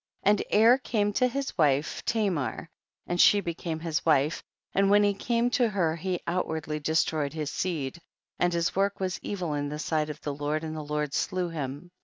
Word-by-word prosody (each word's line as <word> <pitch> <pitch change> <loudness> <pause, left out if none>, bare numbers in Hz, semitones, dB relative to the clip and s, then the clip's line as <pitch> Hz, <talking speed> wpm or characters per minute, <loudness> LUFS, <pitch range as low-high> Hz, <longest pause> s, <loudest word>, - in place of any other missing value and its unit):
And 205 +1 +4
Er 230 +5 +6
came 205 -5 0
to 255 - +3
his 275 +2 -3
wife 145 -1 +2
Ta 220 -2 +1
mar, 155 0 -3 0.3
and 175 0 +1
she 205 - +7
became 170 -3 -4
his 165 -1 -2
wife, 150 -1 +2 0.3
and 195 0 +3
when 205 +1 +5
he 205 0 +3
came 235 +4 0
to 240 -2 +3
her 175 -6 0
he 180 +1 -2
outwardly 160 -3 -2
destroyed 155 -1 0
his 155 -2 -3
seed, 170 -3 -3 0.4
and 175 - +3
his 170 -1 0
work 195 +1 +1
was 185 -2 -2
evil 180 -6 -3
in 145 0 -2
the 150 - -4
sight 155 0 -1
of 150 0 -6
the 145 - -3
Lord, 150 +2 -2
and 160 0 -4
the 155 - -4
Lord 150 -1 -2
slew 185 -2 -1
him. 150 +2 -5
170 Hz, 200 wpm, -28 LUFS, 150-200 Hz, 0.4 s, she